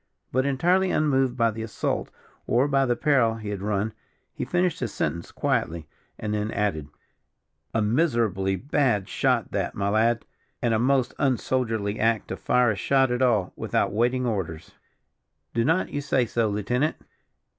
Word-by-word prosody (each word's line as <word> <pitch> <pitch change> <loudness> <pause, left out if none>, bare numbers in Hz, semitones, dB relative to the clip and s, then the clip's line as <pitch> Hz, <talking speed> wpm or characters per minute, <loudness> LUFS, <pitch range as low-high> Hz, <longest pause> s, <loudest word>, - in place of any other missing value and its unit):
But, 130 +2 +1
entirely 180 +8 +2
unmoved 135 -6 +1
by 115 -1 +3
the 110 +1 -6
assault 110 -1 -2 0.4
or 125 +5 +3
by 135 -1 +2
the 120 - +2
peril 130 -7 +2
he 110 -2 -6
had 100 -2 -4
run, 105 +1 -1 0.4
he - - -4
finished 180 -1 0
his - - -3
sentence 85 - -3
quietly, 80 -2 -1 0.3
and 105 -1 -3
then 105 0 -1
added: 100 -9 -1 0.8
"A 110 - +1
miserably 110 - +1
bad 120 -2 0
shot - - 0
that, - - -2
my 100 0 0
lad; 110 +2 +2 0.3
and 120 -2 +1
a 110 - +2
most 130 0 +2
unsoldierly 115 -5 0
act 115 -1 +1
to - - -3
fire 125 -1 +2
a - - -2
shot 135 +6 +2
at 125 +1 -1
all, 110 -8 +2
without - - -1
waiting 125 +3 +1
orders. 95 -9 -3 0.8
Do 115 - +1
not 165 +8 +1
you 145 - -3
say 135 -3 +1
so, 115 -1 0
lieutenant?" 120 +9 0
115 Hz, 165 wpm, -25 LUFS, 105-130 Hz, 0.8 s, by